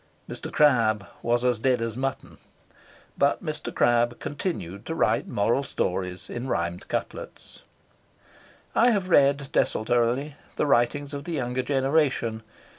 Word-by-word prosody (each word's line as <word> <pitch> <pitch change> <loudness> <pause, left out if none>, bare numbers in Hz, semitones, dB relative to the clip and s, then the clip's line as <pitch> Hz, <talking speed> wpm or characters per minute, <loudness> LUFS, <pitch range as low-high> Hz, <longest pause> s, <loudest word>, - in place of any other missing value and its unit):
Mr. - - -7
Crabbe 115 -8 +3 0.2
was 120 +1 +1
as 125 -3 +2
dead 125 +1 +2
as 115 -1 -3
mutton, 135 +1 -4 0.8
but - - +2
Mr. - - -4
Crabbe 120 0 +2
continued 140 - -4
to - - -3
write - - +1
moral 115 +6 +1
stories 90 -8 -3
in 120 +2 -5
rhymed 85 -5 -2
couplets. - - -6 1.1
I 240 - +5
have 200 -5 0
read 140 -1 +4
desultorily 120 +6 +1 0.2
the - - +1
writings 140 +2 +1
of 140 0 -5
the 175 - -4
younger 125 -3 -1
generation. 135 -4 +1
125 Hz, 130 wpm, -26 LUFS, 115-140 Hz, 1.1 s, I